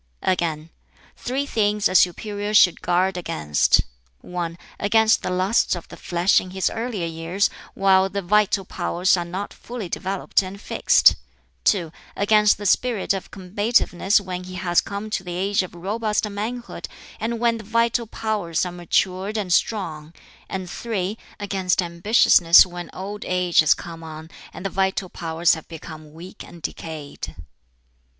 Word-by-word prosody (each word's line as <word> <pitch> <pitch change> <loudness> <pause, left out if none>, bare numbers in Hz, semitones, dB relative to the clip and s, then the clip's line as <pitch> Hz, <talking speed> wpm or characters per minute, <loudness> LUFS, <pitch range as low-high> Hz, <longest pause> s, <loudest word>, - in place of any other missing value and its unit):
Again, 165 -3 -1 0.4
"Three 265 +3 -2
things 210 -5 +1
a 185 - -4
superior 205 +3 +1
should 180 -4 +5
guard 185 +1 +1
against: 75 - +2 0.4
(1) 170 -2 -5 0.2
against 220 +2 +3
the - - -3
lusts 185 +3 +2
of 175 - -8
the - - -10
flesh 175 +2 +2
in 185 - -9
his 190 0 -1
earlier 225 -6 -3
years 165 +4 -1 0.2
while 190 -1 +4
the 200 0 -3
vital 205 +1 +2
powers 180 0 +1
are 175 - -2
not 185 +4 -5
fully 235 -5 -7
developed 190 +3 -1
and 190 +1 -8
fixed; - - +4 0.5
(2) 175 -6 +2 0.3
against 210 +1 +4
the 205 - -7
spirit 225 0 +1
of 195 - -5
combativeness 205 0 +1
when 180 -2 -6
he 185 0 -8
has 175 -2 +2
come 200 +2 -6
to 190 - -2
the 175 -1 -6
age 195 +2 +1
of 185 -2 -8
robust 210 +4 -1
manhood 225 +4 -5 0.3
and 230 +2 -2
when 230 -1 +1
the - - -9
vital 230 +2 +1
powers 210 -7 -2
are 180 - -4
matured 185 +4 -1
and 190 -4 -1
strong, 165 -7 -1 0.4
and 190 -1 -4
(3) 200 0 -3 0.2
against 190 -3 0
ambitiousness 175 -1 +5
when 175 -1 -8
old 205 +2 -6
age 180 -1 +1
has 155 - +6
come 165 -1 -9
on 160 0 -9 0.2
and 190 - -10
the - - 0
vital 190 -1 0
powers 165 0 +1
have 160 - -6
become 155 -2 -10
weak 170 +4 -11
and 170 -2 -14
decayed." 155 -3 -6
190 Hz, 155 wpm, -23 LUFS, 175-210 Hz, 0.5 s, has